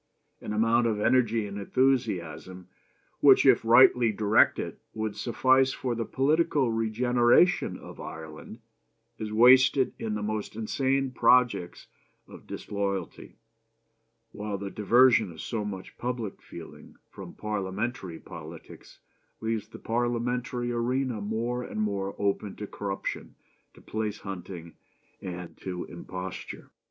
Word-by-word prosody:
An - - -6
amount 115 +2 +2
of 110 -2 -1
energy 115 -1 +2
and 100 0 -6
enthusiasm 95 - -1 0.5
which - - +6
if - - +5
rightly 120 0 +6
directed 105 0 +2 0.2
would 110 -1 -3
suffice 130 +2 +2
for 125 -2 -3
the 115 -1 -3
political 145 -2 +1
regeneration 120 +8 +2
of - - -12
Ireland 80 -1 -9 0.6
is 110 -1 -4
wasted 130 +3 +5
in 110 -1 -3
the 105 - -3
most 105 0 -3
insane 135 +4 0
projects 120 -7 +2 0.4
of - - -14
disloyalty; 100 -3 -4 1.0
while 105 -1 -4
the 100 0 -6
diversion 115 -1 +4
of 80 - -13
so 110 +4 -3
much 95 -2 -7
public 120 -5 -4
feeling - - -12 0.2
from - - -10
Parliamentary 100 -2 -4
politics 85 -2 -12 0.4
leaves 110 -2 -2
the 110 - -11
Parliamentary 120 +1 -2
arena 120 -1 -1
more 115 +4 -2
and 110 - -6
more 100 -2 -2
open 100 0 -1
to 105 - -6
corruption, 100 -1 -5 0.4
to - - -16
place 110 -1 -4
hunting, 90 -3 -8 0.5
and 90 -2 -7
to 90 -2 -5
imposture. 90 +2 -8
110 Hz, 120 wpm, -27 LUFS, 100-120 Hz, 1.0 s, which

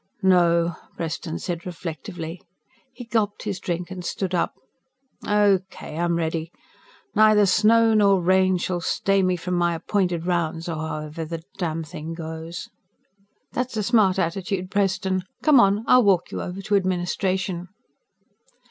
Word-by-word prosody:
"No," 170 -2 +3 0.2
Preston 165 0 -4
said 175 -2 -4
reflectively. 165 -1 -6 0.5
He 245 -1 -10
gulped 215 -3 -1
his 200 -3 -3
drink 175 0 -4
and 185 -1 -6
stood 190 +1 -3
up. 175 - 0 0.7
"Okay. 195 -5 +1
I'm 170 +1 0
ready. 165 0 -2 0.6
Neither 215 -1 +5
snow 225 +4 +4
nor 200 -3 +4
rain 185 +1 +3
shall 175 0 -2
stay 195 +3 +1
me 185 -1 +2
from 180 +1 -4
my 175 -1 +1
appointed 175 -1 -1
rounds, 170 -2 -1
or 165 -2 -3
however 155 +1 -4
the 165 +1 -6 0.2
damned 165 -3 -2
thing 165 0 -7
goes." 160 +2 -6 0.8
"That's 250 -2 -3
a 215 - 0
smart 205 -4 +3
attitude, 185 +1 -2
Preston. 190 -1 0 0.2
Come 300 -4 +6
on 200 0 +4
I'll 250 - +6
walk 190 -4 +2
you - - -4
over 185 +2 -6
to 205 0 +1
Administration." 185 -1 -1
180 Hz, 140 wpm, -24 LUFS, 170-195 Hz, 0.8 s, Come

